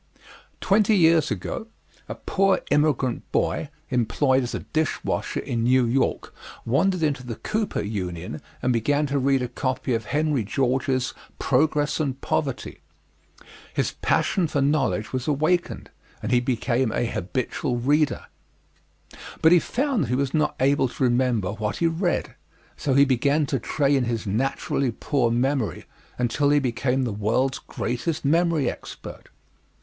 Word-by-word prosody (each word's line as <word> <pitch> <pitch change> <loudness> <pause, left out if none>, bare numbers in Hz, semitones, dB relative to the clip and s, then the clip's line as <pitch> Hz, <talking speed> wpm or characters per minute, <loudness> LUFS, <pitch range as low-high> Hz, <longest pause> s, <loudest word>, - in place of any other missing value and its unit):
Twenty 210 +1 +3
years 165 -3 +4
ago 220 - -4 0.4
a - - -4
poor 195 0 +1
immigrant 145 -4 +1
boy, - - 0 0.2
employed 130 +3 +2
as 125 - -3
a - - -4
dish 155 -1 -2
washer - - -2
in 115 -1 -2
New 125 +1 +4
York, 125 +3 0 0.3
wandered 165 +8 +1
into 140 -5 0
the 120 -2 -5
Cooper 215 - -2
Union 90 -6 -4 0.2
and 125 0 +2
began 145 +6 +1
to 140 0 0
read 135 -1 +2
a - - -1
copy 130 +1 -2
of 115 -1 -1
Henry 150 -4 0
George's 130 +3 0 0.2
"Progress 145 +3 +1
and 135 -4 -2
Poverty." - - -2 1.0
His - - 0
passion 180 -4 +2
for 145 - -1
knowledge 140 -6 +1
was 130 -1 -2
awakened, 155 +4 0 0.3
and - - -2
he 125 - +5
became 125 -1 0
a 120 - 0
habitual 120 - -2
reader. 145 +4 +1 1.2
But 160 - +7
he 175 - +7
found 255 - 0
that - - -8
he 125 - +1
was 135 0 -1
not 150 -2 +1
able 140 +1 +3
to 130 - -4
remember 120 -6 +1
what 105 0 -3
he 170 - 0
read, 170 +2 0 0.4
so 135 -3 -1
he 140 +1 +7
began 140 +3 +2
to 135 -1 -1
train 140 +1 +1
his 115 -1 -2
naturally 130 +4 -1
poor 125 +1 0
memory 125 0 0 0.3
until 125 +4 +1
he 145 - +4
became 130 0 0
the 120 -4 -2
world's 115 +6 0
greatest 140 +6 -3
memory 165 -2 +2
expert. - - -7
135 Hz, 150 wpm, -24 LUFS, 120-150 Hz, 1.2 s, But